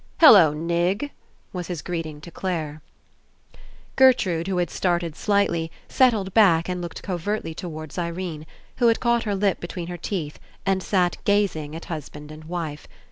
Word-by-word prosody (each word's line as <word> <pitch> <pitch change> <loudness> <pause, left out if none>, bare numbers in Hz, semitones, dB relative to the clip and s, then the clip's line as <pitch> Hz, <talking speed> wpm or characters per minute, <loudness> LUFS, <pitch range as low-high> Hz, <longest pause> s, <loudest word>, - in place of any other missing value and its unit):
*'Hello, 200 - +9
Nig," 170 - -1 0.4
was 180 -2 -4
his 175 -5 -5
greeting 160 -4 -4
to 170 - -11
Clare. 155 -5 -3 1.1
Gertrude 195 -11 +4
who 190 -2 -1
had 175 -1 0
started 175 -3 0
slightly, 185 -6 +1 0.2
set 260 -2 +5
tled 195 -4 -3
back 175 -7 +5
and 180 -1 -3
looked 170 -1 -7
covertly 185 -1 -3
towards 155 -2 -7
Irene, 170 -2 -4 0.3
who 240 - +4
had 230 - +3
caught 235 -1 +1
her 205 -2 0
lip 195 -1 +1
between 175 0 -5
her 175 - -5
teeth 165 -4 -4 0.3
and 195 -1 +1
sat 180 -1 +1
gazing 180 -7 +1
at 165 - -7
husband 150 -2 -7
and 155 0 -11
wife. 160 -3 -5
175 Hz, 160 wpm, -24 LUFS, 160-195 Hz, 1.1 s, Hello